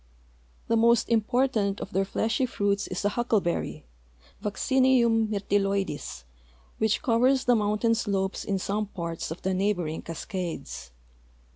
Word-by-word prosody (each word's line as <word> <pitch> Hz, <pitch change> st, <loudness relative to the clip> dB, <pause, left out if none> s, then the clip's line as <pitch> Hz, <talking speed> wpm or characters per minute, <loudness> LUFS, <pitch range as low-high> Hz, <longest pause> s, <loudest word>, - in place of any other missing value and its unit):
The 230 Hz, -, +2 dB
most 230 Hz, 0 st, +4 dB
important 225 Hz, -3 st, +1 dB
of 195 Hz, -, -6 dB
their 195 Hz, +1 st, +2 dB
fleshy 225 Hz, +6 st, 0 dB
fruits 200 Hz, -3 st, 0 dB
is 185 Hz, +2 st, -4 dB
a -, -, +4 dB
huckleberry, 210 Hz, -, -1 dB, 0.6 s
Vaccinium 235 Hz, +1 st, +3 dB
myrtilloides, 195 Hz, -, -1 dB, 0.6 s
which 220 Hz, +4 st, +1 dB
covers 255 Hz, +1 st, +3 dB
the 245 Hz, -, +5 dB
mountain 210 Hz, +2 st, +2 dB
slopes 200 Hz, -4 st, -1 dB
in 195 Hz, -, -1 dB
some 205 Hz, +3 st, -2 dB
parts 170 Hz, -4 st, -5 dB
of 160 Hz, -, -7 dB
the 190 Hz, +1 st, 0 dB
neighboring 185 Hz, -5 st, -1 dB
Cascades. 175 Hz, -, -5 dB
205 Hz, 125 wpm, -27 LUFS, 195-230 Hz, 0.6 s, the